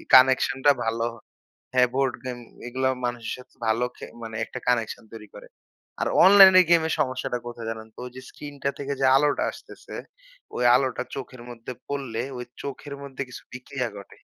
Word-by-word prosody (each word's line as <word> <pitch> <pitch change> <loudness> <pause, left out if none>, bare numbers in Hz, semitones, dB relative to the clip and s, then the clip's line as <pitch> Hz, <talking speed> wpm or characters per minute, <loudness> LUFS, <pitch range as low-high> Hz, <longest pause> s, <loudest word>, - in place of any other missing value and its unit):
কানেকশনটা 130 +2 +5
ভালো 115 +1 0 0.7
হ্যাঁ, 125 -1 +5
বোর্ড 135 -1 +1
গেম 125 -1 -4 0.3
এগুলাও 130 +1 0
মানুষের 120 -2 -3
সাথে 125 - -16
ভালো 115 +3 +2
খে - - -7 0.2
মানে 110 -1 -7
একটা 125 - -7
কানেকশন 115 -2 0
তৈরি 105 -1 -9
করে। - - -11 0.5
আর - - +1 0.2
অনলাইনের 190 -2 +9
গেমের 160 -1 +4
সমস্যাটা 130 -1 -1
কোথায় 115 -1 -7
জানেন 110 0 -7
তো? - - -8
যে 130 - -8
স্ক্রিনটা 145 -2 -5
থেকে 140 0 -2
যে - - +4
আলোটা 145 0 +2
আসতেছে - - -12 0.6
ওই 125 - -1
আলোটা 130 -1 +1
চোখের 130 -2 -7
মধ্যে 120 +1 -8 0.2
পড়লে 135 -5 -3 0.2
ঐ - - -6 0.2
চোখের 140 +1 -6
মধ্যে 140 -1 -7
কিছু - - -10
বিক্রিয়া 125 -1 -4
ঘটে। 100 - -13
130 Hz, 165 wpm, -25 LUFS, 120-140 Hz, 0.7 s, অনলাইনের